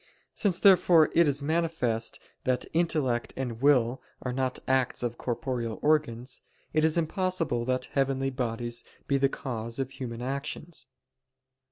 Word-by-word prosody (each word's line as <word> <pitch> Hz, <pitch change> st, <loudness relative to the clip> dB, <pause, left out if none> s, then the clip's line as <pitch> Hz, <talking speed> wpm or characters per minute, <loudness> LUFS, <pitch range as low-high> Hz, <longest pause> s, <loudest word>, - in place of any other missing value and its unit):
Since, 190 Hz, -5 st, +1 dB
therefore, 180 Hz, -5 st, +6 dB
it 170 Hz, -1 st, +5 dB
is 140 Hz, 0 st, 0 dB
manifest 155 Hz, -8 st, -1 dB, 0.2 s
that 125 Hz, -1 st, 0 dB
intellect 150 Hz, -8 st, 0 dB
and 125 Hz, -3 st, -4 dB
will 130 Hz, -3 st, +3 dB, 0.2 s
are 125 Hz, -, -2 dB
not 130 Hz, 0 st, -1 dB
acts 130 Hz, -2 st, +1 dB
of 120 Hz, -1 st, -3 dB
corporeal 120 Hz, -3 st, -2 dB
organs, 135 Hz, -5 st, +1 dB, 0.3 s
it 155 Hz, -, +3 dB
is 160 Hz, +1 st, +3 dB
impossible 165 Hz, -, 0 dB
that 130 Hz, 0 st, 0 dB
heavenly 135 Hz, -1 st, +1 dB
bodies 120 Hz, -2 st, -3 dB, 0.2 s
be 140 Hz, -1 st, +2 dB
the 135 Hz, 0 st, +3 dB
cause 115 Hz, -4 st, -4 dB
of 135 Hz, -1 st, -2 dB
human 120 Hz, -3 st, -6 dB
actions. 140 Hz, +3 st, -5 dB
135 Hz, 140 wpm, -28 LUFS, 120-155 Hz, 0.3 s, therefore